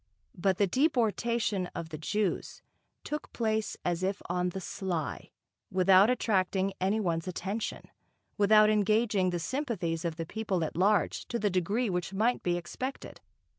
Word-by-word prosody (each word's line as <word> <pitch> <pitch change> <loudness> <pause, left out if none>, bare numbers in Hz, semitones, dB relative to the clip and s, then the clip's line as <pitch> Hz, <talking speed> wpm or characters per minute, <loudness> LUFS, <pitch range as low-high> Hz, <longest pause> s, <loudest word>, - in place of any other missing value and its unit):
But 190 +1 +1
the 205 - +4
deportation 235 - +1
of 165 -1 -5
the 155 - -6
Jews 210 +4 -2 0.4
took 300 0 -5
place 220 -2 -1
as 175 0 0
if 195 +2 -1
on 180 +1 0
the 190 - -5
sly, 180 -4 -4 0.4
without 190 +3 +5
attracting 195 -5 +1
any 195 +4 +2
one's 170 -4 -1
attention, 195 +4 -4 0.5
without 215 +1 +5
engaging 210 -2 +2
the 175 - -1
sympathies 180 - -2
of 170 -2 -2
the 165 0 -4
people 195 -2 -2
at 155 - -4
large 190 -1 +2
to 235 - -2
the 205 -2 0
degree 200 +7 0
which 180 0 -2
might 230 +5 +2
be 175 -1 0
expected. 255 +10 -6
195 Hz, 150 wpm, -30 LUFS, 180-220 Hz, 0.5 s, without